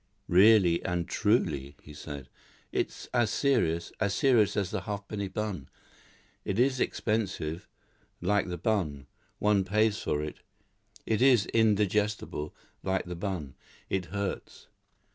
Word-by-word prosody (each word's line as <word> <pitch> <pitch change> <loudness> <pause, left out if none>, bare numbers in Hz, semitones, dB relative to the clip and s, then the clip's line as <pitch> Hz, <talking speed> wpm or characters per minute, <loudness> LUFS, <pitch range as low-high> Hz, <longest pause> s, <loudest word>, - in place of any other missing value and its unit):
"Really 95 -2 +5
and 90 -1 -1
truly," 75 - 0
he 75 - -12
said, 70 -2 -8 0.4
"it's - - -2
as 120 -3 +3
serious 105 - +1
as 100 -2 +1
serious 120 -7 +3
as 100 -2 0
the - - -2
halfpenny 100 0 -4
bun. 95 -7 -4 0.7
It 100 - -2
is 130 +2 +3
expensive, 95 -10 -2 0.5
like 100 +3 +1
the 90 -1 -4
bun; 80 -9 -1 0.3
one 105 -2 +3
pays 105 +2 +2
for 75 0 -1
it. 75 - -6 0.7
It 110 +1 0
is 125 -6 +5
indigestible, 105 -7 +1 0.3
like 95 0 -1
the 90 0 -5
bun. 85 -7 -4 0.4
It 95 -2 0
hurts." 100 +1 -5
100 Hz, 125 wpm, -29 LUFS, 85-110 Hz, 0.7 s, Really